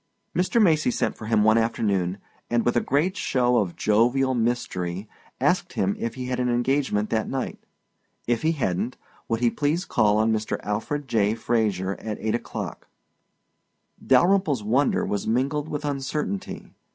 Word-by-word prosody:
Mr. 185 +7 +2
Macy 160 - +4
sent - - -1
for 110 - -8
him 110 -2 +3
one 110 +1 +5
afternoon 100 -5 0 0.3
and 120 -1 +1
with 120 - +2
a 120 - +3
great 155 +8 +1
show 125 -7 +1
of 95 -6 0
jovial 125 +5 +2
mystery 110 -6 -2 0.3
asked - - +1
him 95 +1 0
if 115 0 -3
he 130 - -5
had 125 0 -2
an 125 -1 +1
engagement 120 -3 0
that 110 -1 0
night. 135 -1 -3 0.7
If 120 -1 0
he 160 +1 +2
hadn't, 120 - -2 0.3
would 115 0 -1
he 120 -1 +3
please 155 +5 0
call 105 -1 +2
on 110 +1 +3
Mr. 110 0 -2
Alfred 125 +8 -3
J. 110 -3 +2
Fraser 105 -5 0
at 110 -2 -5
eight 110 - -1
o'clock. 120 - -5 1.2
Dalyrimple's 150 - +3
wonder 130 +7 +2
was 100 -1 -2
mingled 140 +6 0
with 150 0 -4
uncertainty. 135 -7 -3
120 Hz, 160 wpm, -25 LUFS, 110-135 Hz, 1.2 s, one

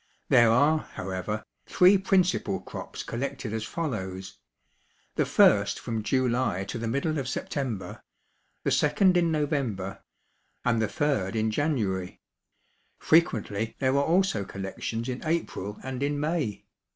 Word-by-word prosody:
There 120 -1 +6
are, 145 +7 +4 0.2
however, 95 +3 -3 0.2
three 185 +2 +6
principal 185 -1 +1
crops - - -7
collected 130 -2 -4
as 110 -1 -2
follows: 95 - -4 0.7
The - - 0
first 100 -1 +4
from 115 -2 -3
July 125 -4 +1
to 120 - -4
the 115 - -3
middle 140 +6 0
of 135 - -4
September; 120 -8 -4 0.6
the - - 0
second 180 +6 +3
in 170 -2 +3
November; 135 - -2 0.6
and 115 -2 +2
the 110 - +1
third 115 -4 -1
in 110 0 +1
January. 105 - -1 0.8
Frequently 115 -9 +1
there 130 0 +1
are 140 - +3
also 170 - +2
collections 100 +5 -5
in 125 -1 -4
April 155 - -2
and 130 -1 -5
in 145 +1 0
May. 150 -8 -2
125 Hz, 130 wpm, -27 LUFS, 105-150 Hz, 0.8 s, There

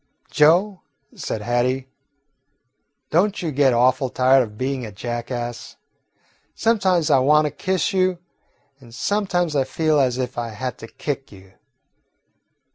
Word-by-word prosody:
"Joe," 180 +6 +3 0.3
said 105 - -5
Hattie, 125 +3 0 1.2
"don't 200 +5 +2
you 165 - -2
get 140 -1 +3
awful 130 +3 +2
tired 130 +2 +4
of 105 -4 -5
being 130 +1 -2
a 110 - -7
jackass? 120 +2 -5 0.8
Sometimes 185 -8 +1
I 135 - +5
want 150 +4 +4
to 150 - -1
kiss 190 +2 -1
you, 185 -1 +1 0.6
and 120 -3 -15
sometimes 175 - -1
I 135 - +3
feel 155 +2 0
as 130 -2 +1
if 125 -1 -3
I 120 - -3
had 120 +4 -5
to 115 - -9
kick 135 +2 -5
you. 95 -1 -16
135 Hz, 135 wpm, -21 LUFS, 120-165 Hz, 1.2 s, I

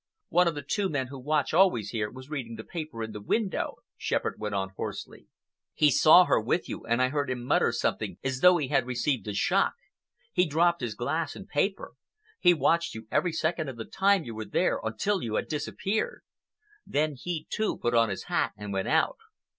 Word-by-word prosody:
"One 180 0 +4
of 165 - 0
the 145 - -5
two 195 +7 -1
men 135 -5 -2
who 135 -1 -8
watch 150 +3 0
always 160 - +3
here 105 -3 -2
was 130 +2 -11
reading 120 -6 -4
the 110 - -8
paper 155 -8 -6
in 110 - -5
the 105 - -7
window," 200 - -1 0.2
Shepherd - - -2
went 105 -1 -3
on 95 0 -1
hoarsely. 95 - -7 0.5
"He 150 -1 +4
saw 165 +6 +7
her - - +2
with 125 +10 0
you - - -6
and 120 +1 +2
I 130 - +2
heard 145 0 -1
him 125 -1 -3
mutter - - +3
something - - -2
as 130 -1 -2
though 180 +3 +7
he 145 -6 -2
had 135 -4 +2
received 125 -3 -1
a 105 - -2
shock. - - +2 0.6
He 180 0 +3
dropped 170 +3 +2
his 115 -4 -3
glass 155 +7 -2
and 195 - -9
his - - -25
paper. 195 0 -1 0.5
He 175 - +6
watched 170 -2 +1
you 110 0 -9
every 180 - +2
second 160 -1 -1
of 130 - -8
the 110 - -5
time 195 -2 +2
you 115 - -7
were 110 0 -5
there - - +1
until 180 - -1
you 110 -2 -3
had - - -1
disappeared. 165 +7 -2 0.6
Then 150 +1 0
he, 160 +3 -5
too, 220 - -1
put 120 - -1
on 115 -1 +4
his 95 - -4
hat - - 0
and 105 0 -6
went 95 0 -1
out." - - +2
140 Hz, 215 wpm, -28 LUFS, 115-170 Hz, 0.6 s, saw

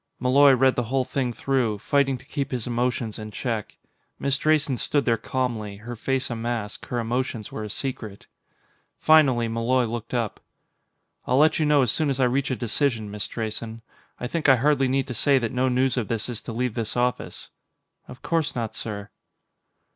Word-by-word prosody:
Malloy 135 +2 +6
read 130 0 +4
the 120 - -1
whole 130 +2 0
thing 130 -1 -1
through, 120 -3 0
fighting 135 +4 +1
to 130 - -18
keep 140 -1 -3
his 125 -4 -3
emotions 120 -2 -1
in 110 0 -6
check. 110 0 -4 0.4
Miss 140 -1 +1
Drayson 155 -2 +2
stood 145 +4 0
there 115 - +3
calmly, 115 -3 -3
her 120 +3 -7
face 130 +3 -1
a - - -2
mask; 115 -2 -4
her 120 - -2
emotions 120 -1 -2
were 110 - -5
a 105 - -5
secret. 110 -4 -5 0.7
Finally, 135 -7 +4
Malloy 115 +3 +1
looked 115 +1 -5
up. 115 -4 -2 0.9
"I'll 125 - +2
let 155 +3 +4
you 155 - +2
know 145 -2 +5
as 120 - +2
soon 155 -2 0
as 135 -1 -1
I - - +4
reach 130 +2 +1
a 130 - 0
decision, 115 -2 -1
Miss 105 0 -4
Drayson. 115 0 -5 0.4
I - - -4
think 155 +3 0
I 135 - +8
hardly 135 +1 +2
need 135 +1 0
say 140 +2 +4
that 120 -3 -1
no 130 0 +1
news 130 0 +1
of 115 -5 -1
this 115 0 -2
is 115 -3 -4
to - - -7
leave 125 0 -1
this 115 +1 -3
office." 125 0 -2 0.6
"Of 125 0 -12
course 165 -3 0
not, 115 -2 -3
sir." 105 -2 -6
125 Hz, 190 wpm, -25 LUFS, 115-135 Hz, 0.9 s, I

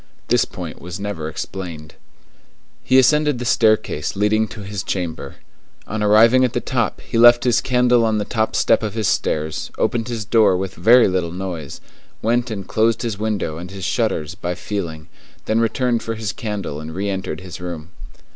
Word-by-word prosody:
This - - +3
point - - -8
was 90 +2 -7
never 100 -6 -4
explained. 80 -2 -7 0.9
He 130 - +3
ascended 150 +2 +4
the 125 - -5
staircase 110 -10 +1
leading 105 +2 +2
to 110 - -9
his 100 0 -5
chamber. 85 -7 -4 0.5
On 110 0 -4
arriving 115 +5 +5
at 125 -2 +1
the - - 0
top, 120 -3 -2
he 115 - -2
left 120 +1 +7
his 120 -2 +3
candle 125 -1 +3
on 110 -1 +1
the 105 - -1
top 110 0 -1
step 115 - +3
of 110 -1 -4
his 110 -4 0
stairs, 80 -1 -1
opened 120 -1 0
his 115 -3 -4
door 110 -4 +4
with 95 0 -4
very 120 +2 +5
little 90 -3 -1
noise, 90 -5 -6 0.4
went 120 +2 0
and 100 -4 -5
closed 115 +2 +1
his 110 -4 -3
window 105 -8 -2
and 90 +1 -8
his 95 -1 -7
shutters 75 +3 -1
by 90 -1 -4
feeling, 85 -7 -5 0.4
then 110 +1 +1
returned 120 +1 +1
for 115 - -4
his 110 -2 -3
candle 105 -9 -4
and 80 +1 -8
re 100 +2 -2
entered 95 -4 -3
his 90 -1 -9
room. 85 -3 -6
105 Hz, 185 wpm, -20 LUFS, 90-115 Hz, 0.9 s, left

